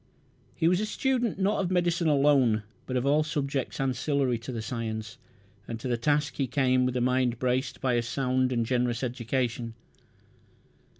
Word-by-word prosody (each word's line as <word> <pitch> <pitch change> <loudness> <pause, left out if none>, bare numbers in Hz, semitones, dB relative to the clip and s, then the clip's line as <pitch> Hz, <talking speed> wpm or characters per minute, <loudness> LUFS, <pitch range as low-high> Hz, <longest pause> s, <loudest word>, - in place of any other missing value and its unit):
He 160 - +2
was 180 +1 +3
a - - 0
student, 245 -2 0
not 200 +2 +1
of 185 - -1
medicine 175 -2 +1
alone, 135 -7 +4 0.2
but 130 - -1
of 125 - -1
all 145 +2 +4
subjects 145 -3 -2
ancillary 135 -1 0
to 120 +3 -7
the 120 - -4
science, 115 0 -4 0.5
and 115 -1 -5
to 120 - -5
the 120 - +1
task 145 +5 0
he 135 - 0
came 130 -1 +2
with 125 0 -2
a - - 0
mind 125 -1 +1
braced 125 +1 -1
by 130 -2 +1
a 120 - +2
sound 130 +1 0
and 120 -2 +1
generous 120 0 0
education. 120 -1 -2
130 Hz, 175 wpm, -28 LUFS, 120-145 Hz, 0.5 s, alone